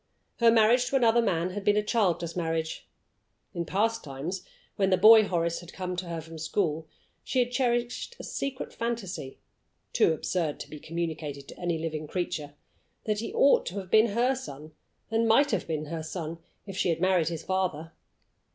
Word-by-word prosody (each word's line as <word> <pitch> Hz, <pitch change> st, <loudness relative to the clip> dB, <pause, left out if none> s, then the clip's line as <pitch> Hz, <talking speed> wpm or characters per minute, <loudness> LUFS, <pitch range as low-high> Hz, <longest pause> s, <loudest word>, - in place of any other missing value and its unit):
Her 235 Hz, -1 st, +6 dB
marriage 230 Hz, +2 st, +5 dB
to -, -, -1 dB
another 235 Hz, -2 st, +4 dB
man 175 Hz, -4 st, 0 dB
had 205 Hz, +2 st, -5 dB
been 205 Hz, 0 st, +3 dB
a 210 Hz, -, +2 dB
childless 180 Hz, -7 st, 0 dB
marriage. 165 Hz, -2 st, -2 dB, 0.6 s
In 170 Hz, -1 st, -3 dB
past 225 Hz, +4 st, 0 dB
times, 150 Hz, +7 st, -5 dB, 0.3 s
when 195 Hz, -1 st, +2 dB
the 185 Hz, -, +4 dB
boy 215 Hz, +2 st, +8 dB
Horace 170 Hz, -2 st, 0 dB
had 175 Hz, 0 st, -12 dB
come 180 Hz, -1 st, -4 dB
to 180 Hz, 0 st, -4 dB
her 170 Hz, -1 st, -4 dB
from 160 Hz, 0 st, -10 dB
school, 160 Hz, -2 st, -1 dB, 0.4 s
she -, -, -3 dB
had 245 Hz, -1 st, +2 dB
cherished 245 Hz, -, -1 dB
a -, -, -7 dB
secret 275 Hz, -1 st, -4 dB
fancy 210 Hz, -, -4 dB, 0.6 s
(too -, -, +4 dB
absurd 160 Hz, -1 st, -1 dB
to -, -, -8 dB
be 150 Hz, -, -8 dB
communicated 155 Hz, -4 st, -4 dB
to -, -, -11 dB
any 175 Hz, -2 st, -1 dB
living 155 Hz, -1 st, -4 dB
creature) 150 Hz, -4 st, -3 dB, 0.5 s
that 210 Hz, -1 st, -1 dB
he 230 Hz, -, -4 dB
ought 280 Hz, -, +4 dB
to 185 Hz, -, -5 dB
have 190 Hz, -2 st, -6 dB
been 220 Hz, +1 st, +6 dB
her 240 Hz, +5 st, +2 dB
son, 155 Hz, -, -8 dB, 0.4 s
and 225 Hz, +1 st, +2 dB
might 275 Hz, +6 st, +4 dB
have 205 Hz, -6 st, -1 dB
been 155 Hz, -2 st, -2 dB
her 160 Hz, +1 st, -4 dB
son, 165 Hz, 0 st, -5 dB, 0.3 s
if 195 Hz, -2 st, -7 dB
she 185 Hz, -, +1 dB
had 165 Hz, -1 st, 0 dB
married 185 Hz, -3 st, +2 dB
his 165 Hz, -1 st, -3 dB
father! 175 Hz, -4 st, -2 dB
180 Hz, 190 wpm, -28 LUFS, 165-225 Hz, 0.6 s, boy